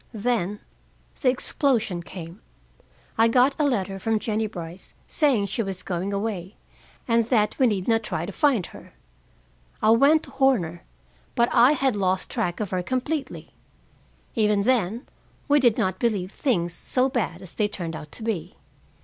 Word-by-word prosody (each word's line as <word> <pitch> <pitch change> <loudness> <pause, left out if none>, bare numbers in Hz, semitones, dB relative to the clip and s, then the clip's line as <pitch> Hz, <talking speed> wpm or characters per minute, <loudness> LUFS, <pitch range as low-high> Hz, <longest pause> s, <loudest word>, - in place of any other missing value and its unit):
Then 210 -3 -1 0.6
the 265 - +4
explosion 245 - +1
came. 170 0 -10 0.8
I 225 - +6
got 255 +4 +4
a 300 - +3
letter 195 -7 -1
from 225 +3 0
Jennie 215 0 -1
Brice 175 -3 -9
saying 270 -10 +2
she 205 +4 -2
was 190 -3 -4
going 185 +2 -3
away, 200 -2 -3 0.5
and 230 -1 +3
that 215 -3 +2
we 260 - +5
need 195 -5 -1
not 225 -1 +3
try 165 -6 -3
to 195 - -6
find 245 - +2
her. - - -13 0.9
I 215 - +4
went 280 +7 +5
to - - -11
Horner, 195 - +1 0.5
but 235 0 +3
I 245 +4 +6
had 270 -4 +1
lost 190 -2 0
track 175 -1 -2
of 210 -3 -3
her 185 -1 0
completely. 260 - -3 0.8
Even 210 -3 +2
then, 230 -2 +1 0.4
we 290 0 +5
did 240 -5 +3
not 185 0 0
believe 205 -6 0
things 175 - 0
so 255 +7 0
bad 210 -9 -2
as 185 - -10
they 210 - +1
turned 170 -5 -5
out 150 -1 -9
to - - -7
be. 220 -7 -3
215 Hz, 165 wpm, -24 LUFS, 185-250 Hz, 0.9 s, I